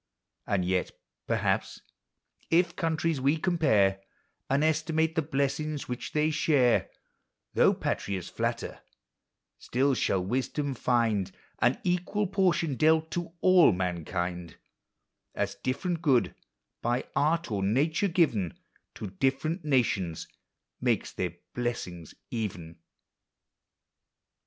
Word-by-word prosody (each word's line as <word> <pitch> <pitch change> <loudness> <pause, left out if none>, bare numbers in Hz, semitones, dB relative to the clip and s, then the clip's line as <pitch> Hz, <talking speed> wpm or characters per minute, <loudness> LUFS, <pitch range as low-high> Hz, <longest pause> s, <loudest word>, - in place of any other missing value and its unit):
And 95 -3 +1
yet, 90 0 0 0.4
perhaps, - - 0 0.7
if 175 +1 +3
countries 165 -3 0
we 140 +4 +3
compare, 140 - +2 0.5
And 140 +2 +2
estimate 160 +1 +1
the 160 - +1
blessings 145 0 -2
which 125 +4 -5
they 155 0 +2
share, 140 -6 +3 0.6
Though - - +4
patriots 95 -3 -2
flatter, - - -3 0.8
still 135 +3 +1
shall 95 -7 0
wisdom 135 +5 -1
find 115 -6 +1 0.3
An - - +3
equal 180 +4 0
portion 180 -7 +1
dealt 160 +2 +3
to 175 -1 -4
all 185 - +6
mankind; 90 -1 -3 0.8
As - - -1
ditTerent 165 +6 -1
good, 135 -7 +3 0.5
by 120 +2 0
art 155 +1 +1
or 100 -2 -1
nature 145 - +2
given, 150 - +1 0.4
To 105 -4 -6
different 135 - -1
nations 115 - 0 0.5
makes - - +1
their 90 -2 -3 0.2
blessing 90 -9 -3 0.2
even. 90 -7 -4
135 Hz, 105 wpm, -28 LUFS, 100-160 Hz, 0.8 s, all